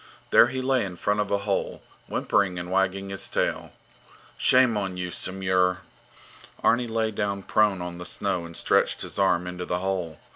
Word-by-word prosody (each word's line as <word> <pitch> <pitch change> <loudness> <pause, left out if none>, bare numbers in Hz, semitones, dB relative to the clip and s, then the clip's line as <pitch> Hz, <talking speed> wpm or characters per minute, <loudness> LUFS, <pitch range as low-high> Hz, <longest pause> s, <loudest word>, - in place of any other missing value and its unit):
There - - +7
he 130 0 -3
lay 130 -1 +2
in 95 -3 -5
front 105 +4 0
of 105 -1 0
a 100 - +2
hole, 100 0 -2 0.2
whimpering 95 -3 0
and 90 +1 -5
wagging 95 +1 0
his 95 0 -3
tail. - - -2 0.6
Shame 130 -3 +4
on 95 -3 -2
you, 90 -1 -4
Samur! 95 -1 0 0.8
Arni 120 +1 +3
lay 110 -1 0
down 100 -2 -2
prone 100 -4 +2
on 90 0 -6
the 90 - -7
snow 85 - -1
and 85 0 -8
stretched - - +1
his - - -5
arm 90 +1 +2
into 90 0 -5
the 90 - 0
hole. 90 -4 -3
95 Hz, 180 wpm, -25 LUFS, 90-105 Hz, 0.8 s, There